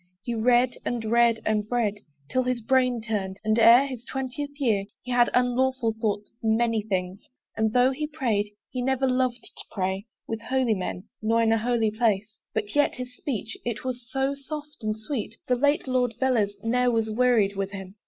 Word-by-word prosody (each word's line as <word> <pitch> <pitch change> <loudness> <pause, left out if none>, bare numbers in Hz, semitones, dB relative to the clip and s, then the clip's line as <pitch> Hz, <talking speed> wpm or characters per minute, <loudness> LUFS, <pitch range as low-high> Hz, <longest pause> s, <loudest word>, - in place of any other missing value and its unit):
he 240 - -3
read, 245 +2 +3
and 235 -2 -2
read, 235 0 +4
and 210 -1 +1
read, 220 -4 0 0.3
'Till 255 - +1
his 250 -1 -1
brain 250 +1 +2
turned 200 -4 -3
and 215 +1 +2
ere 235 +4 +8
his 255 -4 -6
twentieth 265 +3 -4
year, 220 -8 +2 0.2
He 250 - -6
had 245 -1 +4
unlawful 250 -1 +1
thoughts 210 -1 -1
of - - -43
many 225 0 +2
things: 190 -1 -3 0.3
And 220 -1 +1
though 250 +3 +4
he 300 +3 -3
prayed, 235 -9 -1 0.2
he 255 - -3
never 265 +1 +1
loved 255 -1 0
to - - -10
pray 190 +2 -2 0.2
With 225 0 -4
holy 255 -1 +1
men, 185 -2 -4 0.2
nor 225 +1 +2
in 225 - +3
a 225 - +3
holy 230 -1 +1
place 215 -2 0
But 210 -1 -3
yet 290 - +3
his 250 -1 -7
speech, 230 -6 -4
it 235 -2 -3
was 250 -2 -5
so 270 +3 0
soft 295 +2 -8
and 215 -1 -2
sweet, 225 -1 -4
The 250 - +3
late 285 +4 +2
Lord 250 -3 +1
Velez 235 -6 +2
ne'er 250 +2 +2
was 225 -2 0
wearied 220 -4 +3
with 195 0 -2
him. 195 -1 -8
235 Hz, 195 wpm, -26 LUFS, 215-255 Hz, 0.3 s, ere